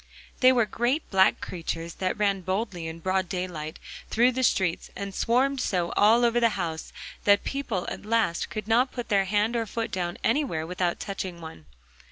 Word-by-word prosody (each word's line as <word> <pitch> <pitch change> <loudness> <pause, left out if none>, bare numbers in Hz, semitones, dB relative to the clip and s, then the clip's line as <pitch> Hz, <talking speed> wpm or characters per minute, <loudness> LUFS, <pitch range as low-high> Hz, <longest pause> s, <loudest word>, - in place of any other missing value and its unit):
They 255 0 +7
were 240 -3 +3
great 240 +8 -1
black 190 0 +4
creatures 165 -1 -4
that 185 +2 0
ran 200 -2 +1
boldly 185 -2 -3
in 160 +1 -7
broad 185 0 0
daylight 175 -4 -4 0.3
through 240 +3 +4
the 260 +1 -2
streets, 190 -8 +1
and 200 0 -5
swarmed 260 +5 +1
so, 175 -6 0
all 230 +4 +5
over 235 0 +3
the 230 -1 +4
houses, 165 -3 -4 0.3
that 200 0 +5
people 250 -10 -3
at - - -5
last 215 -5 0
could 215 -1 -5
not 245 +4 +3
put 245 -2 -6
their 195 -2 +3
hand 210 +4 +1
or 230 -1 -1
foot 225 +2 -3
down 175 -2 -2
anywhere 230 - 0
without 175 0 -1
touching 190 -3 -5
one. 160 - -10
200 Hz, 185 wpm, -26 LUFS, 175-235 Hz, 0.3 s, They